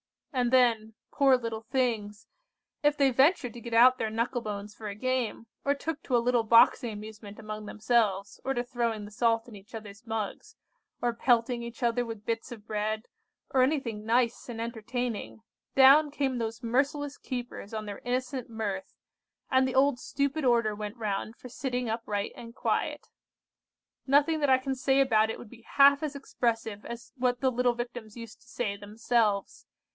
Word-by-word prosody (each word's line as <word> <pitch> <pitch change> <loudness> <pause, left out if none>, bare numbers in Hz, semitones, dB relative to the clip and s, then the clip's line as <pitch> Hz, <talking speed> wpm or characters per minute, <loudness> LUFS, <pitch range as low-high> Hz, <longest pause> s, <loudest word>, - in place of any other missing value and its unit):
And 250 -2 +1
then, 230 -4 +3 0.2
poor 270 -2 +4
little 230 -2 -4
things, 225 -5 -1 0.6
if 295 0 +3
they 275 -2 +4
ventured 265 -1 +3
to 240 - -10
get 235 0 -7
out 255 +3 +6
their 220 - -1
knuckle 230 +3 -1
bones 210 -1 -5
for 215 0 -8
a 200 - -5
game, 255 0 -1 0.2
or 280 0 +2
took 305 +1 -4
to 250 - +2
a 235 - +1
little 245 -1 +3
boxing 230 +1 +5
amusement 210 0 -9
among 215 -1 -7
themselves, 215 -2 0
or 270 0 -1
to 240 - 0
throwing 235 -3 -2
the 205 - -11
salt 230 +1 +1
in 230 - -11
each 200 +3 -13
other's 215 +1 -10
mugs, 225 - -4 0.5
or 240 -1 +1
pelting 235 0 +2
each 235 +2 -7
other 240 +1 +2
with 225 -3 -7
bits 230 +2 -3
of 215 -3 -9
bread, 215 +1 -2 0.4
or 260 - +3
anything 255 -6 0
nice 235 +2 +1
and 230 -2 -6
entertaining, 230 0 -4 0.3
down 275 +3 +7
came 270 -3 -1
those 225 +1 -4
merciless 280 +4 0
keepers 245 -5 -6
on 215 -1 -4
their 205 -1 -6
innocent 255 0 -2
mirth, 205 -4 -4 0.6
and 260 0 +4
the 260 - -3
old 270 -1 +4
stupid 280 +4 -1
order 235 -4 +3
went 210 +2 -6
round 215 0 -3
for 250 - -11
sitting 250 0 -3
upright 215 -3 -2
and 230 0 -10
quiet. - - -1 1.0
Nothing 290 +4 +4
that 290 -2 +1
I 260 - +6
can 265 +1 -3
say 265 +1 +2
about 220 -5 +4
it - - -3
would 225 - -11
be 235 0 -14
half 280 +4 +5
as 300 -2 -3
expressive 225 -6 -2
as 235 0 -8
what 250 -1 0
the 260 -1 +3
little 250 0 +2
Victims 240 -2 -6
used 230 -2 -10
to - - -23
say 220 -4 -2
themselves. 210 0 -1
235 Hz, 180 wpm, -29 LUFS, 220-255 Hz, 1.0 s, down